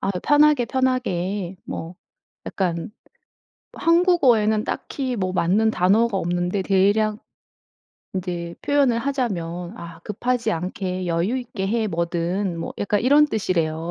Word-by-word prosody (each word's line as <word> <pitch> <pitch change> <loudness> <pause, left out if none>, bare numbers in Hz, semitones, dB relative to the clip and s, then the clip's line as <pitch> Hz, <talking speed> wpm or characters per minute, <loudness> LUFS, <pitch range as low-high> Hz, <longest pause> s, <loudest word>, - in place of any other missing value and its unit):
아 195 - -1
"편하게 290 +7 +3
편하게" 205 -8 -1
뭐 165 +2 -6 0.5
약간 175 -1 -2 0.8
한국어에는 275 - +3
딱히 260 -3 -3
뭐 185 -3 -1
맞는 200 +6 +2
단어가 200 +3 +2
없는데 175 +2 -1
대략 205 +3 +2 1.0
이제 175 -2 -4
표현을 275 -5 +2
하자면 195 -9 -3
아 170 -3 -10
"급하지 230 +2 -1
않게 185 +1 -3
여유 175 +9 0
있게 230 -6 -4
해, 220 +1 0
뭐든." 170 +1 -2
뭐 165 - -5
약간 205 0 0
이런 290 +4 +5
뜻이래요. 170 - -1
200 Hz, 250 characters per minute, -22 LUFS, 175-240 Hz, 1.0 s, 이런